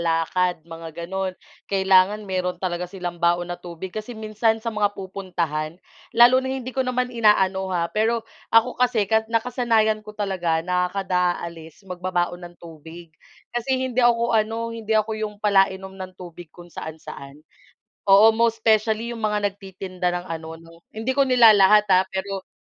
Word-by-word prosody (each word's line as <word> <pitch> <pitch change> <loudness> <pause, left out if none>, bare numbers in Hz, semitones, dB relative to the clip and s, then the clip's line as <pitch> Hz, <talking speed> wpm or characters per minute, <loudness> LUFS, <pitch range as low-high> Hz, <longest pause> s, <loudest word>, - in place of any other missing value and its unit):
lakad 170 +2 0
mga 165 0 -9 0.2
gano'n. 190 +1 -3 0.3
Kailangan 195 +1 +3
mayro'n 185 -2 -2
talaga 180 -1 -3
silang 175 -2 -6
baon 175 +1 +1
na 175 - -8
tubig 175 +1 -8
kasi 220 +2 -6
minsan 220 +1 -1
sa 230 - -2
mga 205 -1 0
pupuntahan 175 -5 -4 0.4
lalo 245 +2 +7
na 260 - -4
hindi 260 -1 -4
ko 265 - -1
naman 250 -1 -1
inaano, 190 -4 +2
ha. 175 -2 0
Pero 225 +1 0 0.2
ako 225 +2 +3
kasi 245 -4 +2
ka 220 +2 +1
nakasanayan 230 -2 +1
ko 210 0 -12
talaga 175 -5 -1
na 180 0 0
kada 180 -2 0
aalis 165 +2 -11
magbabaon 180 -1 -2
ng 175 - -21
tubig 165 0 -12 0.4
kasi 240 +2 -1
hindi 255 -1 -1
ako 235 -1 +3
ano, 225 +1 0
hindi 220 -1 -1
ako 215 +1 +1
yung 210 -1 -4
palainom 195 -2 +1
ng 185 -1 -8
tubig 175 -2 -11
kung 175 +1 -15
saan-saan. 150 -2 -9 0.6
Oo 200 +3 +7
most 225 0 0
specially 220 +1 +2
yung 235 - -7
mga 210 -1 -1
nagtitinda 190 -2 -6
ng 175 0 -2
ano 160 0 -9
'no 165 0 -16 0.2
hindi 225 +4 -2
ko 275 +1 +2
nilalahat, 215 -5 +6
ah, 185 0 +5
pero, 190 0 -5
195 Hz, 160 wpm, -23 LUFS, 175-225 Hz, 0.6 s, lalo